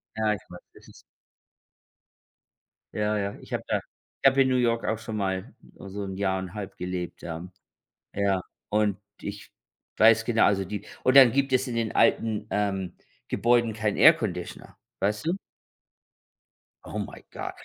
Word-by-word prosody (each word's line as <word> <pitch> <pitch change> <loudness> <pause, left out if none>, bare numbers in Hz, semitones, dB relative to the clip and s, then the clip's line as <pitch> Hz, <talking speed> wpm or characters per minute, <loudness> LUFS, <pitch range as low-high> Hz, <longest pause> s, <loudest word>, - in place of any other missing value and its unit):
Ja, 110 -1 +1
ich 105 - -6
weiß, 90 0 -10
das - - -18
ist - - -16 1.9
Ja, 105 0 0
ja, 100 0 -2
ich - - -11
habe - - -2
da - - +1 0.4
ich - - +6
habe 135 +1 +2
in 130 - +4
New 130 - +2
York 115 -1 +1
auch 110 - 0
schon 110 0 -6
mal 95 -2 -2 0.2
so 100 +1 -6
'n 95 -1 -5
Jahr 95 -1 0
und 95 -1 -7
1/2 100 -2 -6
gelebt, 90 -1 -5
ja. 85 +1 -6 0.7
Ja. 100 -2 +1 0.3
Und 105 -2 +1 0.2
ich 100 0 -7 0.5
weiß 110 0 +6
genau 115 -1 +3
also 95 -1 +2
die 105 +3 -6 0.2
und 130 +1 +3
dann 130 -4 +9
gibt 135 0 +1
es 130 +1 +3
in 125 - -4
den 115 -2 -1
alten, 110 -2 +2
ähm, 95 -3 -1 0.3
Gebäuden 120 -1 +2
keinen 105 -1 -1
Airconditioner, - - +2 0.2
weißt 105 +8 -1
du? 170 - +2 1.5
Oh - - -5
my - - -7
God. - - -5
105 Hz, 165 wpm, -26 LUFS, 95-115 Hz, 1.9 s, dann